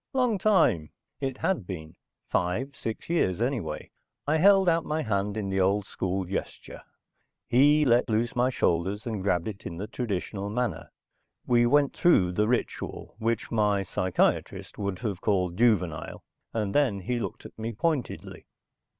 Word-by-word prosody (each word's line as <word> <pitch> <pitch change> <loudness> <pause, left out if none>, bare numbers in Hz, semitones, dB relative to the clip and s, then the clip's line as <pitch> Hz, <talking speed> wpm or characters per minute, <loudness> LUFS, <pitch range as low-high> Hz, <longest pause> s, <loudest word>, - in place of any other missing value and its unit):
"Long 250 -6 +2
time." 165 - +3 0.3
It 135 -2 -3
had 175 - -1
been. 80 -3 -7 0.3
Five 115 +11 -1
six 110 -4 -5
years 160 - +1
anyway. 120 -1 -2 0.3
I 155 +2 +2
held 195 +2 +5
out 165 -1 +3
my 155 +1 -2
hand 100 -1 -1
in 100 -2 -2
the 95 - 0
old 100 +2 +2
school 95 -1 -2
gesture. 95 +2 -6 0.7
He 145 +5 +5
let 120 -2 +3
loose 115 +3 0
my 125 +1 +3
shoulders 95 -3 0
and 110 -5 -3
grabbed 90 -2 0
it 100 -3 -6
in 85 - -7
the 100 - -4
traditional 100 -3 -3
manner. 110 -7 -2 0.6
We 120 -1 +4
went 145 +2 +3
through 95 - +4
the 105 +4 +1
ritual, 125 +1 -2
which 115 0 -1
my 105 -3 +2
psychiatrist 95 -1 -1
would 100 -2 -2
have 100 -2 -4
called 90 -4 +1
juvenile, 95 -8 +1 0.3
and 105 -3 -2
then 130 -10 +2
he 120 +6 -2
looked - - -5
at - - -12
me 115 +1 -3
pointedly. 135 +3 -3
110 Hz, 160 wpm, -27 LUFS, 95-130 Hz, 0.7 s, held